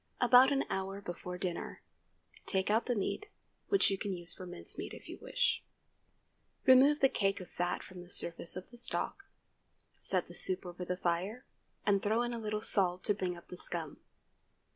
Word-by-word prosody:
About 250 +2 +7
an 275 0 +2
hour 195 +1 -3
before 180 -1 -6
dinner, 180 -1 -4 0.6
take 190 +1 +1
out 220 +2 +2
the 245 - +1
meat, 320 - -2 0.4
which 395 - +4
you 195 - -1
can 205 -2 -2
use 175 0 -2
for 185 - -9
mince 175 0 -4
meat, - - -6
if - - -13
you - - -8
wish; 485 -1 +1 1.0
remove 270 +3 +6
the 270 - +7
cake 195 -5 0
of 185 - -10
fat 175 0 -2
from 185 -1 -10
the 175 - -13
surface 170 -1 -1
of 185 - -7
the 240 - -9
stock, 245 +10 +1 0.7
set - - +3
the - - -12
soup 370 - +3
over 180 0 -6
the 180 0 -3
fire, 190 +8 -2 0.4
and 200 -2 +3
throw 220 +3 +1
in 240 0 -2
a 235 - -4
little 215 -1 -3
salt 185 -4 +2
to 205 - +4
bring 185 -3 -3
up 170 - -15
the 180 - -8
scum. 165 -4 -3
195 Hz, 190 wpm, -33 LUFS, 180-245 Hz, 1.0 s, About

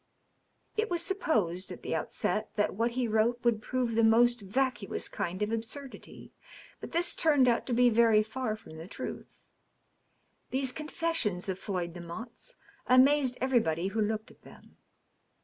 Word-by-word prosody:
It 440 0 +1
was 345 -1 0
supposed, 195 - 0
at 180 - -9
the - - -3
outset, 180 +6 -2
that 205 - +1
what 230 +5 +1
he 250 -2 +1
wrote 225 +3 +1
would 235 -3 +2
prove 250 0 -1
the 230 +1 +3
most 240 +1 +4
vacuous 235 +1 -1
kind 185 +4 -3
of 210 - -2
absurdity. 230 +5 -7 0.5
But - - -8
this 345 +1 +1
turned 290 -5 +4
out 235 -1 +1
to 250 - -1
be 245 +1 +5
very 225 -1 +5
far 220 0 -3
from 180 -7 -13
the 165 +2 -8
truth. - - -8 1.0
These 265 0 0
confessions 305 - -1
of 190 0 -3
Floyd 180 -4 -3
Demotte's 220 - -9 0.3
amazed 260 0 +4
every 260 -1 +3
body 165 -1 -1
who 220 +2 -1
looked 215 +1 -2
at - - -22
them. - - -17
230 Hz, 160 wpm, -30 LUFS, 205-260 Hz, 1.0 s, be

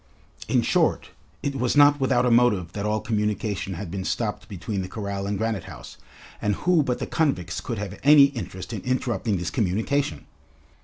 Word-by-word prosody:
In - - +2
short, - - +1 0.3
it 140 - -1
was 125 +2 0
not 145 0 +6
without 130 -2 +2
a 125 - +2
motive 115 -8 +3
that 105 0 -3
all 110 0 0
communication 105 -3 -2
had 90 -1 -6
been 95 0 -4
stopped 105 +2 -3
between 100 +1 -4
the 90 - -5
corral 100 0 -4
and 100 0 -1
Granite 110 -4 -2
House, - - -11 0.4
and 105 -1 +1
who 175 - +2
but 125 -3 -1
the - - -3
convicts 115 - -1
could 115 - -4
have 100 -2 -6
any 145 +1 +8
interest 95 -9 -2
in - - -4
interrupting 120 -4 -1
this 90 0 -3
communication? 110 - -1
110 Hz, 185 wpm, -24 LUFS, 95-125 Hz, 0.4 s, any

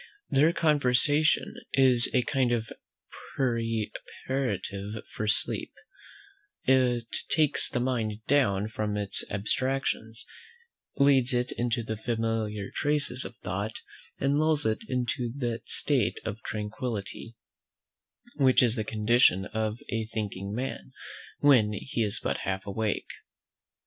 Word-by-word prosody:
Their 150 +4 +5
conversation 150 -1 +3 0.2
is 130 -3 +5
a 125 - +2
kind 130 -2 +1
of 115 -2 -1 0.7
preparative 115 -3 -2
for 110 - -3
sleep; - - +2 0.9
it 125 -3 +3 0.2
takes 155 -3 +2
the - - -1
mind 115 -4 -2
down 105 -8 +2
from 105 -1 -2
its 100 -1 -1
abstractions, 115 +2 -2 0.7
leads 135 -2 +4
it 125 +1 0
into 120 0 -1
the 110 -1 -4
familiar 110 -3 -2
traces 145 -4 +1
of 120 - -8
thought, 100 +4 -3 0.4
and 140 +2 +2
lulls 155 -1 +2
it 110 -1 +1
into 125 -1 -1
that 120 -4 -3
state - - +1
of 110 - -4
tranquillity, 110 +1 -5 1.0
which 130 -3 +5
is 120 -2 +4
the 110 - 0
condition 105 -2 +3
of 110 0 -2
a 115 -1 -1
thinking 100 -3 -4
man, 125 +5 -5 0.5
when 120 -7 +5
he 120 +5 -3
is 105 -2 0
but - - -1
half 95 0 -3
awake. 105 +2 -2
115 Hz, 120 wpm, -28 LUFS, 105-130 Hz, 1.0 s, Their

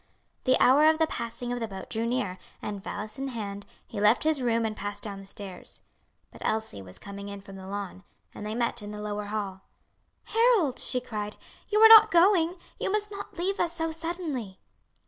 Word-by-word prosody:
The 255 - +5
hour 285 +4 +6
of 315 0 +5
the 320 - +4
passing 240 -3 -4
of 245 - -3
the 225 - -2
boat 195 -2 -8
drew 230 0 -1
near, 210 -7 -1 0.2
and 205 -2 -5
valise 215 +4 -5
in 270 - -2
hand, 205 -5 -5 0.2
he 205 - -6
left 210 +3 +4
his 310 -3 +2
room 230 -2 +1
and 215 -1 -2
passed 205 0 -5
down 200 -2 -5
the 195 - -13
stairs. 195 -2 -8 0.5
But - - -14
Elsie 220 - -2
was 90 -1 -10
coming 200 0 -8
in 200 0 -7
from 195 0 -12
the 190 0 -9
lawn, 195 -1 -5 0.3
and - - -8
they 215 +1 -3
met 235 -1 0
in 205 - -7
the 210 0 -7
lower 210 0 -3
hall. 205 -2 -4 0.6
"Harold," 450 - +3
she 250 - -1
cried, 210 -4 -5 0.3
"you 425 - +1
are 445 - +11
not 440 -1 +10
going? 350 0 +4 0.2
You - - -1
must 415 0 0
not 400 -2 -8
leave 380 +3 -1
us 340 - +1
so 325 0 -1
suddenly." 320 - -4
230 Hz, 205 wpm, -28 LUFS, 205-320 Hz, 0.6 s, are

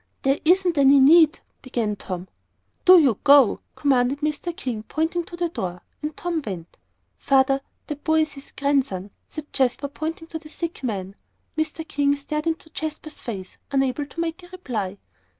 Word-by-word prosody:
"There 270 +2 +2
isn't 355 -1 +3
any 275 0 +7
need," 315 +3 +6 0.2
began 230 -5 -2
Tom. 185 -2 -6 0.6
"Do 370 -1 +10
you 270 - +4
go!" 280 -5 +6 0.2
commanded 270 0 +2
Mr. 305 +3 -1
King, 235 -5 -3
pointing 320 +8 -1
to 345 - -9
the 345 -1 0
door. 180 - -5 0.2
And 300 0 -4
Tom 345 -2 -2
went. 180 -7 -7 0.4
"Father, 270 0 +3 0.2
that 295 -1 -6
boy 315 0 +3
is 310 -1 -1
his 275 -1 -12
grandson," 270 -9 0 0.2
said 310 -1 -9
Jasper, 265 +1 +1
pointing 320 +3 -5
to 320 - -5
the 305 -1 -13
sick 335 +1 -5
man. 195 -5 -3 0.4
Mr. 315 +1 -2
King 285 0 +2
stared 300 +2 -4
into 320 -1 -3
Jasper's 310 -1 -5
face, 190 -6 -7
unable 270 +1 0
to 335 - -10
make 335 +2 -2
a 355 - -13
reply. 235 - -4
285 Hz, 170 wpm, -24 LUFS, 250-320 Hz, 0.6 s, Do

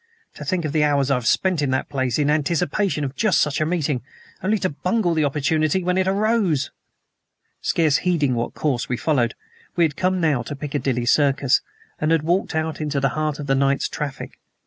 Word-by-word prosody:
To - - -9
think 180 -4 -1
of 150 - -2
the 155 0 +2
hours 140 -2 +2
I - - +5
have 125 -3 -1
spent 185 -5 +2
in 145 - 0
that 130 0 -1
place, 130 -4 -1
in 150 -1 +2
anticipation 155 +3 0
of 135 -1 -4
just 215 -8 +2
such 150 0 +1
a 155 - +1
meeting 155 -7 -1 0.4
only 210 +3 +1
to 185 -2 -1
bungle 180 +4 0
the 160 -1 +1
opportunity 155 +4 +1
when 180 +1 +1
it 190 0 +1
arose!" 195 - +1 0.9
Scarce 155 -4 +2
heeding 160 -8 +1
what 120 0 -3
course 135 -5 -1
we 125 - -1
followed, 125 -7 +1 0.4
we 175 - +3
had 155 -3 +1
come 185 0 0
now 155 -7 +2
to 130 +5 -6
Piccadilly 140 -4 -2
Circus, 140 0 +3 0.4
and 155 - 0
had 165 -2 +2
walked 175 +1 0
out 160 0 -2
into 150 -2 -1
the 135 0 +2
heart 155 +1 -2
of 145 - -6
the 135 - +1
night's 140 0 +2
traffic. 145 -3 -6
150 Hz, 205 wpm, -22 LUFS, 140-170 Hz, 0.9 s, I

